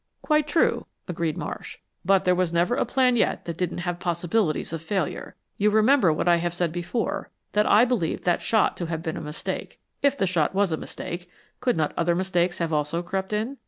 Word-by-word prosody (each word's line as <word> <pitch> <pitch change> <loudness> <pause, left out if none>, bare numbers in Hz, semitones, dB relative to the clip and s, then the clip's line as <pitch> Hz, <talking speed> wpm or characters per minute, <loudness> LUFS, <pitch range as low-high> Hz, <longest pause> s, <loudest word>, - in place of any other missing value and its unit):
"Quite 305 -1 +2
true," 310 +2 +1 0.2
agreed 170 -3 -2
Marsh, - - -6 0.3
"but 195 +1 +3
there 180 - +4
was 180 -2 +1
never 170 +6 +2
a 260 - +1
plan 255 -2 +3
yet 235 - +1
that 170 - -4
didn't 175 0 -2
have 175 -1 -2
possibilities 175 -1 0
of 165 - -3
failure. 170 -1 -3 0.2
You 210 +1 +4
remember 220 - +4
what 155 +3 -1
I 175 -1 +6
have 175 0 -2
said 175 -2 0
before; 175 +7 -3 0.2
that 210 0 +2
I 220 +4 +6
believed 230 -11 -1
that 175 -1 +1
shot 220 -2 +2
to 175 - -3
have 165 -1 -4
been 160 -2 -3
a - - -5
mistake. 150 0 -5 0.2
If 280 0 +2
the 195 - +2
shot 175 -2 +1
was 200 -2 +2
a - - +2
mistake, 175 +3 -7 0.3
could 245 -2 +1
not 155 -2 0
other 170 0 +2
mistakes 180 -1 0
have 165 -2 -1
also 150 +3 0
crept 190 +2 -3
in? 220 +6 -2
180 Hz, 210 wpm, -25 LUFS, 170-210 Hz, 0.3 s, I